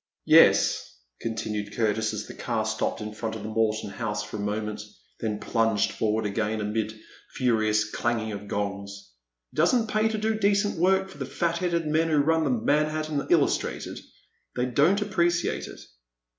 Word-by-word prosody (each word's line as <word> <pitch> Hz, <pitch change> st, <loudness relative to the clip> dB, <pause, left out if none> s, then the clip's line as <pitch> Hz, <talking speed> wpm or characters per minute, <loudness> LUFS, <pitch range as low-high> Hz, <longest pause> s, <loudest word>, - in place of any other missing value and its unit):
Yes," -, -, +5 dB, 0.2 s
continued 105 Hz, -2 st, -3 dB
Curtis, 110 Hz, -1 st, +1 dB
as -, -, -4 dB
the -, -, -9 dB
car -, -, -2 dB
stopped -, -, -2 dB
in 105 Hz, 0 st, -5 dB
front 110 Hz, +1 st, -4 dB
of 110 Hz, -, -7 dB
the 110 Hz, -, -5 dB
Morton 110 Hz, -2 st, 0 dB
House 105 Hz, 0 st, -3 dB
for 105 Hz, +1 st, -7 dB
a -, -, -7 dB
moment, 105 Hz, +1 st, -3 dB, 0.4 s
then 105 Hz, -2 st, -2 dB
plunged 115 Hz, -3 st, +1 dB
forward 110 Hz, 0 st, 0 dB
again 110 Hz, +1 st, -1 dB
amid 105 Hz, +1 st, -1 dB
a -, -, -17 dB, 0.4 s
furious 110 Hz, -4 st, +2 dB
clanging 110 Hz, 0 st, -1 dB
of 100 Hz, 0 st, -7 dB
gongs, 100 Hz, -4 st, -4 dB, 0.4 s
it -, -, -16 dB
does 170 Hz, +10 st, +4 dB
n't 230 Hz, -2 st, +1 dB
pay 215 Hz, +1 st, +2 dB
to 220 Hz, 0 st, -2 dB
do 215 Hz, 0 st, 0 dB
decent 200 Hz, -3 st, +2 dB
work 190 Hz, +2 st, +3 dB
for 190 Hz, -, -13 dB
the 135 Hz, -, -2 dB
fat 170 Hz, +4 st, -1 dB
headed 170 Hz, -2 st, 0 dB
men 160 Hz, +2 st, +1 dB
who 155 Hz, -, +2 dB
run 160 Hz, +3 st, +3 dB
the -, -, +1 dB
Manhattan 150 Hz, +4 st, 0 dB
Illustrated. -, -, +1 dB, 0.6 s
They 125 Hz, -, 0 dB
don't 150 Hz, -, +3 dB
appreciate 175 Hz, -4 st, 0 dB
it." -, -, -10 dB
115 Hz, 175 wpm, -26 LUFS, 105-165 Hz, 0.6 s, Yes